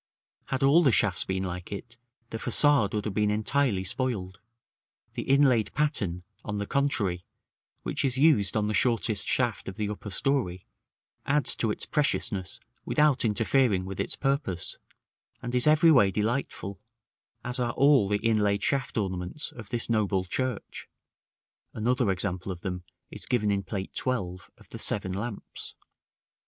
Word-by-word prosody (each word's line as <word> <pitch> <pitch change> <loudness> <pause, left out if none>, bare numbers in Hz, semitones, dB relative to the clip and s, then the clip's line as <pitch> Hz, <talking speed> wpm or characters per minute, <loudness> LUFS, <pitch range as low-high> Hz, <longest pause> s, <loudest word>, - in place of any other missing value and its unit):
Had 135 +1 -2
all 145 +5 +6
the 140 -6 +4
shafts 105 -4 +3
been 95 0 -2
like 90 0 -6
it, 115 +4 -7 0.4
the 115 - -4
façade 140 -6 +4
would 105 - -2
have 105 - -3
been 105 0 +1
entirely 110 -1 +1
spoiled; 100 -4 -3 0.7
the - - -4
inlaid 135 -6 +3
pattern, 105 - -1 0.2
on 105 -1 -4
the 100 - -2
contrary, 105 -10 0 0.6
which - - -2
is 130 -2 +1
used 130 - +4
on 105 -1 0
the 110 - -1
shortest 110 -2 +2
shaft 120 -6 0
of 95 - -9
the 105 -2 -2
upper 105 0 -6
story, 100 -6 -1 0.6
adds 145 +1 +3
to 115 - +1
its 105 - -3
preciousness 105 -10 -1 0.2
without 150 -3 +2
interfering 115 -2 +2
with 95 0 -7
its - - -2
purpose, 135 - -2 0.6
and 120 0 -6
is 125 +3 +3
every 155 +2 +6
way 125 -10 +5
delightful, 105 -2 -3 0.6
as 125 +1 +2
are 120 -2 -1
all 140 -7 +4
the 105 +2 -1
inlaid 105 -2 +1
shaft 135 -4 0
ornaments 95 +6 -3
of 110 -4 -11
this 120 -2 -3
noble 100 -5 0
church 125 +4 -4 0.9
(another 120 0 +1
example 95 0 -1
of 90 -2 -7
them 90 -2 -4 0.3
is - - -7
given 110 -5 +1
in 100 -1 0
Plate 95 -1 -6
XII. 100 -9 -1 0.2
of - - -19
the - - -6
"Seven 95 -3 0
Lamps"). 105 +3 -5
110 Hz, 155 wpm, -27 LUFS, 95-130 Hz, 0.9 s, all